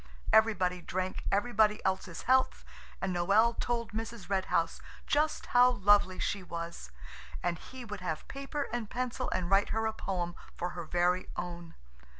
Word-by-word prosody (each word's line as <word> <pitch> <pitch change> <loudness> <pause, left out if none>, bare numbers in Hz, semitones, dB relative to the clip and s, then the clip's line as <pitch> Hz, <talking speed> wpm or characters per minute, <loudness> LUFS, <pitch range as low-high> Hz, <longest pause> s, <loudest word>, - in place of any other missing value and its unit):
Everybody 190 -5 +4
drank 185 +2 -3
everybody 215 0 +3
else's 190 -2 -1
health 260 0 +2 0.4
and 185 -2 0
Noël 210 +7 +3
told 235 -1 -1
Mrs. 225 -3 -6
Red 190 -1 +1
House 165 0 0 0.2
just 305 +1 +1
how 245 0 +7
lovely 205 -5 +4
she 200 - -1
was, 170 - -6 0.5
and 175 -2 -1
he 260 -2 -9
would 205 -3 -6
have 160 -4 -4
paper 275 +1 -4
and 235 -3 -2
pencil 255 0 -2
and 185 0 -2
write 195 +1 +4
her 220 0 0
a 220 - 0
poem 180 -5 -3 0.2
for 175 - -2
her 175 -1 -6
very 175 +2 +1
own. 175 -1 -6
195 Hz, 155 wpm, -31 LUFS, 180-230 Hz, 0.5 s, how